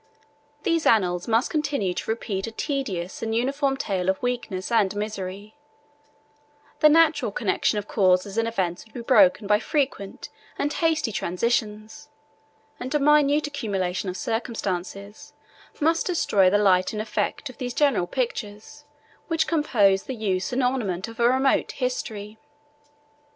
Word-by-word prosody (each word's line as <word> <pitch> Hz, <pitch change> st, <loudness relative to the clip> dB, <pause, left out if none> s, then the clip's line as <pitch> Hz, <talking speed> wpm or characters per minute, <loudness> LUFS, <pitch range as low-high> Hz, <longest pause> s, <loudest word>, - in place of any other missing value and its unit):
These 330 Hz, -1 st, +1 dB
annals 180 Hz, -5 st, +2 dB
must 230 Hz, +2 st, +1 dB
continue 285 Hz, -, -1 dB
to -, -, -5 dB
repeat 215 Hz, -3 st, -2 dB
a -, -, -6 dB
tedious 215 Hz, -, -3 dB
and 225 Hz, 0 st, -2 dB
uniform 270 Hz, +3 st, 0 dB
tale 190 Hz, -9 st, -1 dB
of 190 Hz, -, 0 dB
weakness 235 Hz, -6 st, -3 dB
and 210 Hz, -4 st, +2 dB
misery; 205 Hz, 0 st, -5 dB, 1.2 s
the 305 Hz, -, +7 dB
natural 305 Hz, -6 st, +4 dB
connection 210 Hz, 0 st, 0 dB
of 205 Hz, 0 st, -4 dB
causes 190 Hz, 0 st, +2 dB
and 230 Hz, 0 st, +1 dB
events 185 Hz, -6 st, -2 dB
would 220 Hz, -, -24 dB
be 245 Hz, -, -5 dB
broken 215 Hz, -4 st, +4 dB
by 210 Hz, +1 st, +3 dB
frequent 260 Hz, -6 st, -2 dB, 0.3 s
and 290 Hz, +1 st, -1 dB
hasty 320 Hz, -7 st, +1 dB
transitions, 215 Hz, +7 st, -2 dB, 0.7 s
and 255 Hz, +4 st, -4 dB
a -, -, +3 dB
minute 295 Hz, +1 st, +4 dB
accumulation 195 Hz, -10 st, -2 dB
of 180 Hz, -, -5 dB
circumstances 200 Hz, -3 st, -4 dB, 0.5 s
must 325 Hz, +2 st, +1 dB
destroy 205 Hz, -, +3 dB
the 205 Hz, -, +3 dB
light 190 Hz, -2 st, +3 dB
and 210 Hz, -, -3 dB
effect 225 Hz, -, -2 dB
of 255 Hz, -, -22 dB
those 245 Hz, -2 st, -4 dB
general 275 Hz, -12 st, +2 dB
pictures 235 Hz, +4 st, -5 dB, 0.4 s
which 330 Hz, -2 st, +1 dB
compose 215 Hz, -, +2 dB
the 260 Hz, -, -5 dB
use 195 Hz, -5 st, -1 dB
and 255 Hz, +1 st, 0 dB
ornament 220 Hz, -8 st, -1 dB
of 230 Hz, 0 st, -11 dB
a 235 Hz, 0 st, +4 dB
remote 265 Hz, +2 st, +2 dB
history. 220 Hz, -5 st, -4 dB
225 Hz, 145 wpm, -24 LUFS, 195-270 Hz, 1.2 s, the